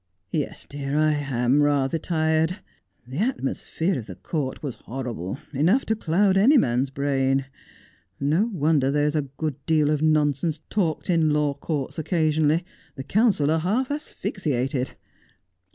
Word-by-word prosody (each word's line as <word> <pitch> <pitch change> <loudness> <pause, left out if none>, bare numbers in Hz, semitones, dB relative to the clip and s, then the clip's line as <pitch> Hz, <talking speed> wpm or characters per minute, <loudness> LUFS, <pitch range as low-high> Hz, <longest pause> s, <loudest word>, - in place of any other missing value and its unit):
' 90 +1 -49
Yes, 150 -3 -3
dear, 140 0 -3
I 155 0 +4
am 140 -2 +1
rather 145 +1 +2
tired. 160 +2 +1 0.5
The 130 +5 -6
atmosphere 190 - -1
of 110 - -9
the - - -8
court 145 -5 -4
was 140 -4 -3
horrible, 120 -6 -4 0.2
enough 175 - +2
to 220 - +1
cloud 190 +1 +2
any 255 +10 +6
man's 125 - +2
brain. 135 -1 0 0.7
No 160 +11 +2
wonder 150 -6 +2
there 145 +1 +2
is 150 +1 0
a 145 -3 -1
good 150 -4 -3
deal 155 -2 +3
of 150 -1 0
nonsense 155 0 +2
talked 175 -7 0
in 165 -3 +3
law 150 -1 +1
courts 145 +1 -4
occasionally. 160 0 +1 0.3
The 135 - -6
counsel 190 - +2
are 160 - +2
half 225 - 0
asphyxiated. 140 - -2
150 Hz, 150 wpm, -24 LUFS, 135-165 Hz, 0.7 s, any